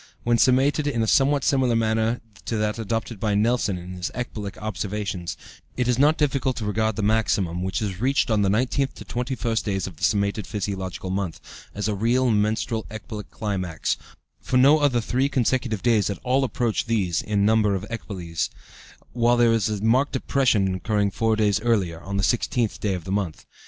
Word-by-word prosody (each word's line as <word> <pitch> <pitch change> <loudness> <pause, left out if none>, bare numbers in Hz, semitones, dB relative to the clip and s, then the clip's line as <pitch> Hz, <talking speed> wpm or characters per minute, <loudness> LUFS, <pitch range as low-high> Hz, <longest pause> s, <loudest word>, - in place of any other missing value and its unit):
When 120 0 +3
summated 135 +5 +3
in 115 -3 0
a - - -1
somewhat 140 +3 +3
similar 130 -4 +2
manner 110 +1 +1 0.2
to 115 - -2
that 105 +1 -1
adopted 115 0 -3
by 105 -1 0
Nelson 110 -2 +1
in 90 +1 -8
his 90 -1 -4
ecbolic 105 -5 -5
observations, 105 -4 -4 0.4
it 125 -1 +1
is 125 0 +1
not 150 +3 +4
difficult 135 -3 +1
to 110 - -3
regard 110 +1 0
the 110 - -2
maximum, 100 -5 +1
which 95 +3 -2
is 95 -1 -4
reached 135 -1 +2
on 110 -1 +3
the 100 - +2
19th 130 +6 +1
to - - -10
21st 120 -2 -2
days 95 -4 -1
of 90 -5 -8
the - - -18
summated 100 0 +1
physiological 95 -3 -4
month, 95 -3 -2 0.4
as 105 0 -2
a 105 - 0
real 120 +5 +2
menstrual 110 +1 0
ecbolic 110 -1 -7
climax, 95 -7 -2 0.4
for 130 - 0
no 140 +4 +6
other 135 -5 +2
three 130 +5 0
consecutive 125 -4 0
days 115 -4 +3
at 100 - -3
all 130 +2 +2
approach 120 -3 -1
these 95 -8 +1
in 100 -1 0
number 105 -2 +3
of 95 +1 -4
ecboles, 90 -7 -4 0.6
while 120 0 +3
there 120 -1 +4
is 110 -2 +1
a 105 -1 -3
marked 125 +6 +3
depression 120 -8 +2
occurring 100 +1 0
four 110 +2 +1
days 105 -2 +2
earlier, 95 -8 0
on 100 +2 -4
the 100 - 0
16th 120 0 0
day 100 -3 0
of 90 - -6
the 95 - -6
month. 95 -5 -2
110 Hz, 190 wpm, -24 LUFS, 100-120 Hz, 0.6 s, no